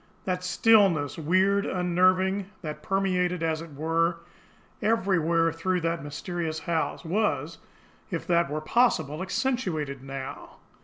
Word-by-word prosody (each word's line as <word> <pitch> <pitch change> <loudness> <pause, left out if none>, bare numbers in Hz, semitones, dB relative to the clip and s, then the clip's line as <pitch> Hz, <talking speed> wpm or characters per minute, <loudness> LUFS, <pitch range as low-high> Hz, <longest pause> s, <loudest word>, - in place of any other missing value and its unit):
That 180 -1 -2
stillness, 180 - +3
weird, 190 +5 +2
unnerving, 185 +2 +2 0.2
that 150 -1 -5
permeated, 180 -2 0
as 160 -1 0
it 165 -3 -10
were, 165 +3 0 0.6
everywhere 180 -7 +2
through 180 +2 -1
that 165 -2 -1
mysterious 160 +2 -4
house, 165 +1 -2
was, 210 +6 -1 0.5
if - - -4
that 170 -3 +2
were 155 +1 -3
possible, 160 - +1
accentuated 180 - -2
now. 135 -1 -7
170 Hz, 115 wpm, -27 LUFS, 160-190 Hz, 0.6 s, stillness